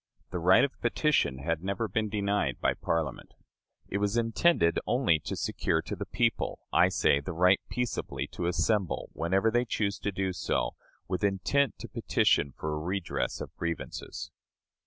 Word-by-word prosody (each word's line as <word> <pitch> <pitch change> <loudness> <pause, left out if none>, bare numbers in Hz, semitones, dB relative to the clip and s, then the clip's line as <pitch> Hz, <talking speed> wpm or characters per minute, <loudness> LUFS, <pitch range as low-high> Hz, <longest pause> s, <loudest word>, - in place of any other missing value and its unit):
The 90 - -2
right 90 +3 +6
of 140 - -2
petition 150 - +2
had 80 +4 -2
never 100 +3 -1
been 110 +2 -1
denied 100 - 0
by - - +2
Parliament. 80 -5 -3 0.5
It 100 - -2
was 105 +2 0
intended 115 - +3
only 120 - +3
to - - -5
secure - - 0
to - - -4
the - - -6
people, - - 0 0.2
I - - +5
say, 70 - +3
the 75 +5 -5
right 90 +3 +4
peaceably 125 -2 -2
to 85 - -3
assemble, 90 +2 0
whenever 95 +6 +1
they 120 +1 +3
choose 105 -4 -1
to 105 - -2
do 95 -1 -1
so, - - -1 0.4
with 90 +1 -2
intent 100 +6 +1
to - - -6
petition 70 - +2
for 75 0 -3
a 75 - -2
redress 90 +3 -2
of - - -7
grievances. 85 -2 -5
95 Hz, 165 wpm, -29 LUFS, 85-110 Hz, 0.5 s, right